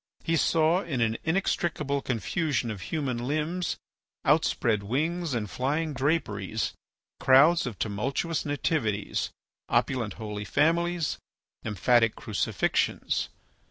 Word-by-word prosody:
He 165 - +1
saw 165 +2 +3
in 155 -9 -3
an 115 -1 +1
inextricable 160 -4 0
confusion 130 - -1
of 100 -3 -6
human 135 -6 -1
limbs, 155 +7 -1 0.5
outspread 110 -3 +2
wings, 155 - -1
and 110 -3 -1
flying 150 - -1
draperies, 115 - -1 0.5
crowds 150 +5 +5
of 110 -6 -5
tumultuous 135 +10 -1
Nativities, 140 -8 -1 0.4
opulent 115 -6 +1
Holy 105 -2 -5
Families, 165 - +1 0.4
emphatic 115 +2 +3
Crucifixions. 110 -5 0
135 Hz, 100 wpm, -28 LUFS, 110-160 Hz, 0.5 s, crowds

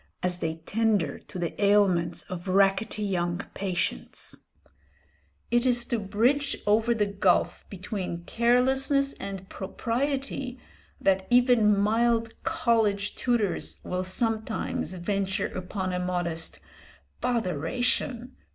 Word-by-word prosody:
as 180 -1 0
they 160 -2 -2
tender 210 -9 +1
to - - -10
the 175 +3 -3
ailments 190 -4 +3
of 180 0 -7
rackety 195 +3 +2
young 175 -3 0 0.2
patients. 185 -2 -2 1.2
It 240 0 +3
is 245 -2 +3
to 235 -2 -1
bridge 245 +8 +1
over 220 +3 +3
the 210 -2 +2
gulf 195 -2 +1
between 185 -3 -5
carelessness 265 +5 +2
and 195 -1 -6
propriety 260 +6 -2 0.4
that 190 -1 +2
even 245 -4 +5
mild 230 +2 +2
college 225 -10 +1
tutors 235 -6 0
will 180 0 -2
sometimes 220 0 -1
venture 195 +2 -1
upon 185 0 -3
a 180 - -1
modest 175 -2 -2 0.6
"botheration!" 235 - -1
205 Hz, 105 wpm, -27 LUFS, 185-240 Hz, 1.2 s, even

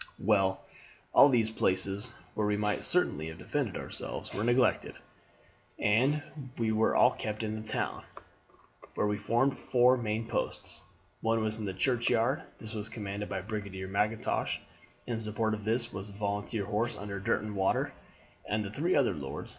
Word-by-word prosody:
"Well, 95 -2 +2 0.5
all 145 - +9
these 115 -4 +3
places, 100 +2 0 0.2
where 105 -1 0
we 105 0 +1
might 105 0 0
certainly 80 - +1
have 80 0 -7
defended - - -2
ourselves, - - -5
were 105 - -1
neglected, 120 +2 +2 0.8
and 130 +8 +3 0.3
we 115 -2 +1
were 110 0 +3
all - - +6
kept 105 +1 -4
in 110 0 -2
the 110 - -10
town, - - -2 0.9
where - - +1
we 105 0 0
formed 120 +6 +2
four 125 +1 +6
main 110 -1 -2
posts. - - -3 0.4
One 115 0 +2
was 110 0 -1
in 105 - -3
the 95 - -2
churchyard, 120 +3 +2
and - - -15
this 110 0 -3
was 110 -1 -4
commanded 105 -2 -5
by 95 -1 -2
Brigadier 100 -2 -5
Mackintosh. 105 +3 0 0.5
In 120 -2 -2
support 110 0 -1
of 105 -1 -4
this 115 +2 0
was 95 +1 -5
the 100 - -12
volunteer 100 +1 -2
horse 110 +5 -1
under 100 -1 -5
Derwentwater 100 0 0 0.6
and 105 +2 +1
the 100 - -5
three 160 - +1
other 135 -8 +3
lords. 70 -4 -6
110 Hz, 165 wpm, -31 LUFS, 100-115 Hz, 0.9 s, all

